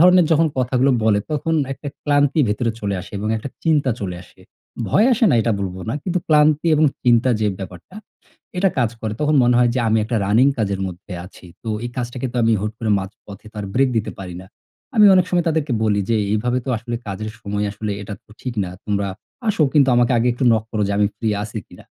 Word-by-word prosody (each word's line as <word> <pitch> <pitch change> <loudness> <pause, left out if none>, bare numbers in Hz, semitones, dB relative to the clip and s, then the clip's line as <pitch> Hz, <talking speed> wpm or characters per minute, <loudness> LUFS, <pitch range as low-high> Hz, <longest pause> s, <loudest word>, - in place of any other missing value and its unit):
ধরনের 180 0 +6
যখন 160 +1 +4
কথাগুলো 130 +1 +2
বলে 105 -2 +4
তখন 160 +2 -1 0.2
একটা 145 +2 -7 0.2
ক্লান্তি 145 +1 +3
ভেতরে 115 +3 0
চলে 100 -1 -2
আসে - - -12
এবং 105 - -3
একটা 110 +5 -5 0.2
চিন্তা 150 -5 +2
চলে 90 -3 -4
আসে। - - -21 0.5
ভয় 215 +5 +4
আসে 230 0 +2
না - - +3
এটা 115 - +1
বলবো 95 -1 -4
না 115 - -1
কিন্তু 180 -1 -1
ক্লান্তি 155 0 +4
এবং 155 - +3 0.2
চিন্তা 120 +1 +4
যে 105 - +2
ব্যাপারটা, 95 - -10 0.6
এটা 195 +1 +4
কাজ 120 -3 +2
করে। 110 -1 -3
তখন 150 0 +2
মনে 120 0 +3
হয় 120 -1 +4
যে - - 0
আমি 110 0 +3
একটা 115 +2 -2
রানিং 110 +6 +4
কাজের 100 -3 -1
মধ্যে 90 +2 -9
আছি, 95 - -15 0.2
তো 115 - -6 0.2
এই 120 - -4
কাজটাকে 125 +1 -3
তো 125 - -5
আমি 115 - +3
হুট 105 - -2
করে 110 -2 -1
মাঝপথে 100 +2 -10
তো - - -17
আর 100 - -5
ব্রেক 135 +1 +3
দিতে 110 - -3
পারি 90 -2 -7
না। - - -14 0.5
আমি 210 -1 +8
অনেক 185 -1 +4
সময় 175 -2 +2
তাদেরকে 155 -4 0
বলি 105 -2 +2
যে, 115 - +3 0.2
"এভাবে 120 +4 0
তো - - -4
আসলে 120 +2 -5
কাজের 105 +2 -4
সময় 105 -1 -2
আসলে 105 0 -4
এটা 105 +1 -6
তো - - -27
ঠিক 125 -2 -5
না। 90 - -6 0.2
তোমরা 100 -1 0 0.4
আসো 180 -6 +2
কিন্তু 140 -3 +5
আমাকে 120 +1 +3
আগে 115 - +1
একটু 125 +2 -2
নক 110 -1 +2
করো 110 -2 -1
যে, 100 - 0
আমি 105 - +4
ফ্রি 115 - -2
আছি 110 +1 -5
কিনা?" - - -15
120 Hz, 225 wpm, -20 LUFS, 105-145 Hz, 0.6 s, আমি